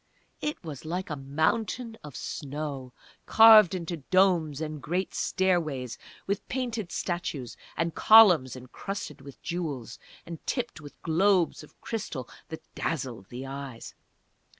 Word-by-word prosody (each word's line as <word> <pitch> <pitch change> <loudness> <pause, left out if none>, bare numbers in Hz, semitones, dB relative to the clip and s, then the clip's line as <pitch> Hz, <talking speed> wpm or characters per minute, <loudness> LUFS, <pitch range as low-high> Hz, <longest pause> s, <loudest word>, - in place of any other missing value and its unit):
It 300 -7 -3
was 150 -5 -7
like 175 +3 -4
a - - -1
mountain 180 - -1
of 150 -4 -10
snow, 140 -3 -5 0.4
carved 220 -4 +8
into 170 -1 -4
domes 165 -2 +2
and 155 -2 -5
great 180 +7 -2
stairways, 155 - 0 0.3
with 200 +1 -2
painted 235 -7 -3
statues, 155 - -3 0.2
and 165 0 0
columns 180 - +7
encrusted 140 +5 -7
with 140 -1 -12
jewels, 150 -9 -4 0.3
and 165 -2 -8
tipped 240 - -2
with 145 -1 -12
globes 175 0 +2
of 150 - -18
crystal 160 - -4 0.2
that 160 - -7
dazzled 125 -11 -3
the 125 +2 -7
eyes. 135 -3 -7
160 Hz, 125 wpm, -28 LUFS, 140-190 Hz, 0.4 s, carved